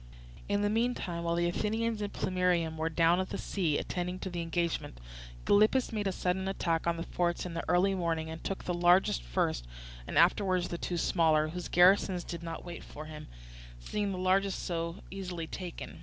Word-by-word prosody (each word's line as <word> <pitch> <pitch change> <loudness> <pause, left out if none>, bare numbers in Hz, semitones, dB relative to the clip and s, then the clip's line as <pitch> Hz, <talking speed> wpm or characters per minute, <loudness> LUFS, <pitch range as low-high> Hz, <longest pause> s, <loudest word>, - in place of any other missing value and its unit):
In 205 0 +1
the 205 - +2
meantime, 220 -7 -1
while 170 0 0
the 175 0 +2
Athenians 220 +4 -1
in 205 - -2
Plemmyrium 180 -4 0
were 160 +1 -1
down 165 +2 +3
at 185 - -2
the - - -3
sea, 170 -7 0
attending 180 0 -3
to 190 - -4
the 175 -1 -3
engagement, 165 - -2 0.5
Gylippus 215 +5 +4
made 210 -2 -1
a - - +1
sudden 185 +1 -1
attack 170 -4 -1
on 170 0 +1
the 165 - -3
forts 175 0 -1
in 175 - -5
the 165 - -3
early 180 +3 +4
morning 165 -3 -1
and 160 0 -7
took 195 - -3
the 180 - -2
largest 175 - +4
first, - - -1 0.4
and - - -3
afterwards 185 -3 +3
the 170 - -4
two 175 - -2
smaller, 160 -3 +3
whose 175 +2 -5
garrisons 180 0 +4
did 170 -1 -6
not 165 -1 -6
wait 175 -1 -7
for 150 - -9
him, 155 -1 -9 0.5
seeing 205 - -2
the 185 - -3
largest 190 +1 +1
so 170 +1 -3
easily 180 -4 -5
taken. 175 +1 -7
175 Hz, 195 wpm, -31 LUFS, 165-190 Hz, 0.5 s, Gylippus